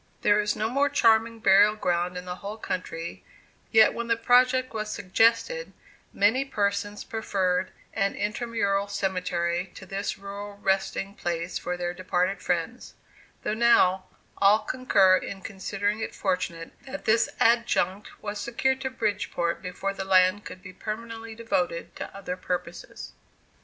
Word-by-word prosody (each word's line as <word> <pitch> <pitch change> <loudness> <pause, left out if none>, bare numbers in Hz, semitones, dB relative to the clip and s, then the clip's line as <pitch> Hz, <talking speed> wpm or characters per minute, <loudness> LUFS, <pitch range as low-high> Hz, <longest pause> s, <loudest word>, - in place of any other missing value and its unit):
There 205 0 +4
is 210 0 0
no 215 - -1
more 280 +4 +2
charming 230 -4 +3
burial 205 +1 +6
ground 180 -3 -1
in 180 - -6
the 180 0 -5
whole 205 +3 -6
country; 170 -5 -5 0.5
yet 220 -1 +6
when 235 0 -4
the 230 -1 +2
project 255 +2 +3
was 215 -1 -3
suggested, 230 - +1 0.4
many 220 +7 +3
persons 205 -4 -2
preferred 190 -6 -1 0.2
an 200 -2 0
intermural 205 -2 -1
cemetery 180 -2 -1
to 190 - -10
this 195 +2 -3
rural 200 +1 -8
resting 195 0 -1
place 170 -2 -3
for 180 +1 -3
their 175 0 -2
departed 185 +1 -1
friends; 180 +8 -3 0.5
though - - -1
now, 190 -5 +4 0.3
all 200 +2 +6
concur 195 -7 +4
in 195 0 -6
considering 205 +1 -2
it - - -4
fortunate 175 -3 -2 0.2
that 285 +2 -7
this 225 +1 +3
adjunct 210 -4 +2
was 205 0 -4
secured 265 +3 0
to 265 - -2
Bridgeport 205 -8 -1
before 195 +1 -3
the 195 - -4
land 185 +1 +4
could 185 - -9
be 185 -1 -10
permanently 225 +2 -6
devoted 180 -7 -2
to - - -7
other 180 -2 -4
purposes. 180 -1 -5
200 Hz, 145 wpm, -26 LUFS, 185-225 Hz, 0.5 s, burial